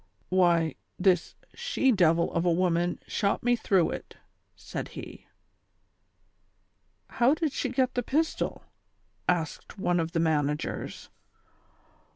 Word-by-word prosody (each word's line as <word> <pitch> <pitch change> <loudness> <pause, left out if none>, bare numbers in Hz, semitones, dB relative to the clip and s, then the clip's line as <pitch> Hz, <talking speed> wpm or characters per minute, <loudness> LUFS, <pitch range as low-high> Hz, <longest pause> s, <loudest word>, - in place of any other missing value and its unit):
" 100 - -40
"Why, 170 -4 +3 0.2
this 180 -2 +2 0.2
she 470 - +1
devil 170 -5 +3
of 165 - +1
a 175 - +3
woman 175 0 +1
shot 200 -2 0
me 245 0 +3
through 190 -6 +2
it," - - -8 0.4
said - - -6
he. - - -9 0.9
" - - -25
How 250 +5 +5
did 315 -2 -1
she 260 - -2
get 255 0 +1
the 245 - 0
pistol? 310 +7 -1 0.4
" - - -11
asked 160 +6 -8
one 180 -2 +1
of 165 0 -2
the 165 - +1
man 155 -3 +2
agers. 150 0 -5
180 Hz, 140 wpm, -28 LUFS, 165-245 Hz, 0.9 s, How